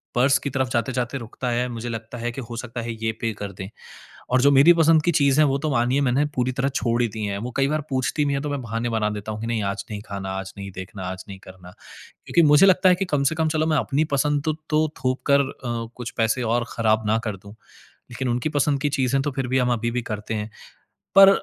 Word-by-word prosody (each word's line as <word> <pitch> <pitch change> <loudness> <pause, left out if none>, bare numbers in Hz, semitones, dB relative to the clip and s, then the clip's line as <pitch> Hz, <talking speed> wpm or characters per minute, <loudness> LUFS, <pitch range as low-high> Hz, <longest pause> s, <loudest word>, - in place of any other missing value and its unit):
Purse 130 +3 +4
की 140 - -3
तरफ़ 130 -1 -1
जाते-जाते 125 +2 -1
रुकता 120 +2 -5
है। 120 +1 0
मुझे 120 0 -5
लगता 115 +1 -6
है 120 +1 -2
कि 135 - -5
हो 120 -1 -8
सकता 120 0 -5
है 115 0 -4
ये 110 - +1
पे 115 - 0
कर 100 -1 -5
दें। 95 +1 -7 0.6
और 130 +1 +4
जो 140 - +6
मेरी 140 +5 +7
पसंद 165 -1 +4
की 175 - +2
चीज़ 140 -3 +3
है - - +6
वो 135 0 +1
तो 155 +2 -2
मानिए 125 +2 +2
मैंने 135 +2 +2
पूरी 125 -1 0
तरह 135 +1 0
छोड़ 120 -3 0
ही 120 - +1
दी 110 0 -5
है। 100 -1 -2
वो 120 +4 -5
कई 135 0 +2
बार 155 +1 0
पूछती 130 +3 0
भी 140 - 0
है 140 - -1
तो 150 - -3
मैं 145 -1 -2
बहाने 115 +1 -3
बना 110 -2 0
देता 105 0 -5
हूँ 105 - -6
कि - - -3
नहीं 115 -2 -1
आज 100 0 -3
नहीं 105 -1 -5
खाना, 100 -1 -5
आज 95 0 -6
नहीं 100 0 -6
देखना, 95 +2 -7
आज 95 0 -5
नहीं 95 -1 -8
करना। 95 -1 -13 0.6
क्योंकि 170 - +3
मुझे 150 +6 +7
लगता 190 0 +5
है 180 - +5
कि 195 +2 -2
कम 145 -6 0
से 150 +4 +1
कम 160 0 +1
चलो 155 0 +1
मैं 155 -1 +2
अपनी 145 +1 +1
पसंद 145 +1 +1
तो 155 - +1 0.2
तो 155 0 +2 0.2
थोप 130 0 0
कर 140 - +6
अ, 120 -4 -4
कुछ 125 -1 -6
पैसे 115 +2 +1
और 120 0 +1
खराब 110 -1 +1
ना 110 +1 +3
कर 105 -3 -3
दूँ। 100 +3 -14 0.6
लेकिन 125 +1 -3
उनकी 120 +4 0
पसंद 145 -1 +1
की 145 - +2
चीज़ें 135 -1 +1
तो 145 - -1
फिर 130 -1 -2
भी 130 +1 +2
हम 125 -1 +2
अभी 120 0 -1
भी 120 +1 -2
करते 110 -1 -5
हैं। 105 0 -4 0.7
पर 195 0 +10
125 Hz, 265 wpm, -23 LUFS, 110-140 Hz, 0.7 s, पर